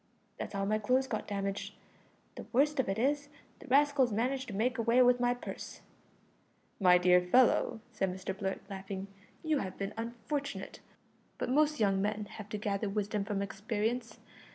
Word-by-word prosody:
That's - - -5
how 195 0 0
my 215 +2 +1
clothes 255 +5 +2
got 230 -5 -4
damaged. 200 -1 -3 0.6
The - - -9
worst 285 +3 +3
of 260 - +1
it 195 - -1
is, 290 +4 +1 0.3
the - - -13
rascals 280 -2 +4
managed 255 +5 -1
to 210 - -6
make 240 +4 0
away 230 +2 +3
with 245 0 +4
my 245 0 +2
purse." 245 - -8 1.0
"My 180 -3 +6
dear 180 0 +5
fellow," 225 +3 +3
said 195 -4 -1
Mr 185 +1 -5
Blurt, 195 -1 -3
laughing, 195 -1 -5 0.4
"you 310 -3 +1
have 190 -5 -5
been 200 +1 -3
unfortunate. 240 +5 -4 0.6
But - - -2
most 300 +2 +3
young 195 -3 +2
men 210 +1 -1
have 210 -1 -9
to 210 - -3
gather 205 0 -1
wisdom 205 0 -1
from 200 -1 -1
experience. 220 +4 -2
215 Hz, 170 wpm, -32 LUFS, 195-255 Hz, 1.0 s, My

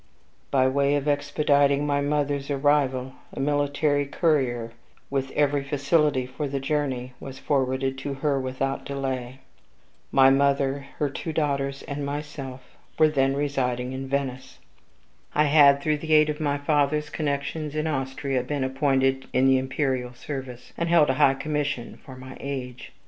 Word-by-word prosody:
By 130 -1 +3
way 140 +2 +2
of 145 0 -2
expediting 145 0 +2
my 145 -1 +1
mother's 145 -1 -1
arrival, 135 -2 +1 0.2
a - - -7
military 145 0 +1
courier, 130 -7 0 0.4
with 135 -1 -1
every 145 -1 +1
facility 145 -1 +1
for 135 +4 -4
the 140 0 -2
journey, 135 -3 -2
was 135 -1 -8
forwarded 135 -1 -1
to 140 0 -4
her 140 0 0
without 130 +1 -2
delay. 135 -2 -4 0.7
My 135 0 +6
mother, 140 0 +1
her 150 - +1
two 145 +4 -5
daughters, 140 -3 -1
and 145 0 -5
myself, 140 -2 -5 0.4
were 155 - +5
then 135 -2 +1
residing 130 -3 -1
in 135 0 -5
Venice. 135 -1 -3 0.8
I 150 - +4
had, 140 -2 +5
through 155 -1 +1
the 155 +1 -2
aid 155 0 +5
of 150 - -7
my 145 -2 0
father's 150 +1 +1
connections 150 0 -3
in 155 0 -1
Austria, 135 -2 -1
been 140 +2 -2
appointed 135 0 +1
in 130 +1 +3
the 135 0 +5
imperial 130 -2 -2
service, 130 -2 -7
and 170 0 0
held 160 -5 +5
a 130 - -2
high 135 - +5
commission 145 -3 -3
for 130 - -11
my 130 0 -10
age. 130 -3 -6
140 Hz, 155 wpm, -25 LUFS, 130-145 Hz, 0.8 s, My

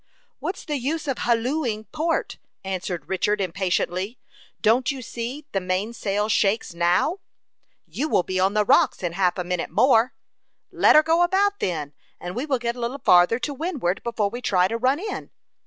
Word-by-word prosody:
"What's 375 - -5
the 295 -3 -2
use 295 +5 -3
of 270 -3 -2
hallooing 235 -1 0
port?" 330 +2 -1 0.2
answered 185 -2 -4
Richard, 205 +2 0
impatiently. 190 +3 -1 0.4
"Don't 240 +4 +3
you 270 -3 -3
see 245 +6 -6
the 195 - -1
mainsail 200 +2 -1
shakes 210 -2 +1
now?" 175 - +1 0.7
"You 305 +3 -3
will 180 - +3
be 185 +1 -2
on 190 +2 +2
the 210 -1 +3
rocks - - +3
in 170 -2 -2
half 180 0 +1
a 180 - -1
minute 180 -1 -3
more." 255 -1 +3 0.6
"Let - - +5
her 305 - +8
go 330 +2 +2
about, 400 +3 +2
then, 150 -5 -3 0.3
and 180 +2 -6
we 260 +6 -3
will 270 -3 +1
get 235 0 -2
a - - -9
little 240 +3 -3
farther 180 -3 +5
to 285 +3 -3
windward 280 - -2
before 220 -4 -1
we 240 +2 -6
try 185 -5 +2
to 230 - -3
run 255 +4 +2
in." 415 +5 -5
230 Hz, 180 wpm, -24 LUFS, 185-275 Hz, 0.7 s, her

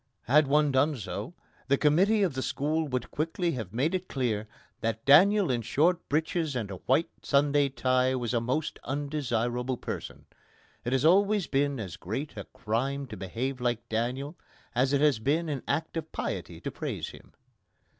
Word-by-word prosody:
Had 150 +4 +4
one 150 +1 +3
done 140 +2 +2
so, 100 - -6 0.3
the 140 0 +3
commiteee 195 +9 +4
of 170 - -2
the 130 - -2
school 155 +4 -1
would 125 -3 -3
quickly 165 +3 -1
have 110 - -5
made 135 - 0
it 185 0 -2
clear 110 -5 -1 0.3
that 115 0 -2
Daniel 190 +4 +6
in 120 -2 0
short 165 - +1
breeches 160 0 0
and 110 -5 -3
a 95 - -5
white 150 +6 +3
Sunday 145 0 +3
tie 130 0 +1
was 120 -2 -2
a 120 - +2
most 130 +6 -2
undesirable 130 -3 -1
person. - - -6 0.6
It 120 - -2
has 135 +2 +2
always 200 +3 +4
been 140 -1 0
as 90 -6 -6
great 110 - -5
a 100 - -6
crime 135 +6 -2
to 110 - -6
behave 120 +8 -4
like 120 -2 -1
Daniel 125 +7 -2 0.4
as 130 +2 +2
it 140 -1 +2
has 150 -7 +4
been 155 +8 0
an 140 -4 -2
act 155 +4 -1
of 160 -1 -4
piety - - -4
to - - -4
praise - - -4
him. - - -15
135 Hz, 175 wpm, -28 LUFS, 120-155 Hz, 0.6 s, Daniel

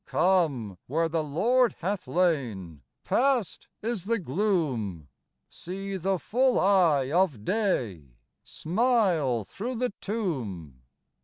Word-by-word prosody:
Come 145 - +1
where 165 +5 +1
the 165 -1 -1
Lord 230 - +2
hath 190 +2 -3
lain: 120 - -1 0.2
Past 250 -6 0 0.2
is 220 -5 -2
the 230 +2 +1
gloom; 135 - -1 0.4
See 195 +2 -6
the 190 +1 0
full 250 - +1
eye 170 -9 +3
of 160 - +1
day 115 - -1 0.3
Smile 175 - +1
through 235 - -5
the 245 -2 -1
tomb. 115 - -4
175 Hz, 105 wpm, -27 LUFS, 125-205 Hz, 0.4 s, eye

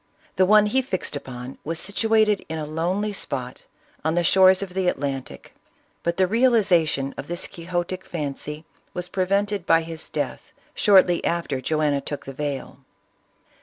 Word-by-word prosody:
The 185 -1 +4
one 210 +1 +6
he 260 +6 +2
fixed 190 - -4
upon 130 -2 -7
was 165 +2 -3
situated 215 +1 +2
in 160 - -3
a 155 - -3
lonely 180 +7 -1
spot 130 -9 -5 0.4
on 160 +2 +1
the 175 - +2
shores 190 +2 +5
of 185 -2 -8
the 185 -1 0
Atlantic, 135 -5 -3 0.5
but 170 0 -1
the 190 - +4
realization 185 - +2
of 140 - -6
this 175 +1 -3
quixotic 175 +1 -4
fancy 150 0 -5 0.3
was 180 0 -3
prevented 195 +1 0
by 165 0 +5
his 160 -1 -8
death, - - -4 0.2
shortly 185 -4 +5
after 165 -6 -1
Joanna 150 -1 +1
took 145 - -6
the 135 - -7
veil. 140 -1 -4
170 Hz, 155 wpm, -24 LUFS, 150-195 Hz, 0.5 s, one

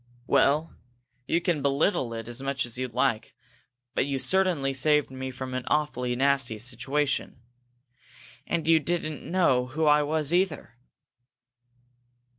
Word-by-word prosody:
"Well, 140 +4 +2 0.5
you 165 - +2
can 170 -4 0
belittle 140 - +1
it 115 0 -6
as 120 +2 -4
much 140 0 -1
as 120 - -6
you 130 0 -2
like, 110 -2 -1 0.6
but - - 0
you 140 -1 -1
certainly 170 -4 +1
saved 150 -1 +2
me 130 0 -5
from 130 0 -6
an 130 0 -3
awfully 125 -5 0
nasty 135 -3 +1
situation. 130 +5 -2 1.1
And 170 -2 -1
you 165 -1 +6
didn't 155 -1 -3
know 135 -9 +1
who 155 +4 -1
I 150 0 +5
was, 155 +1 -1
either!" 175 -9 0
140 Hz, 135 wpm, -27 LUFS, 130-155 Hz, 1.1 s, you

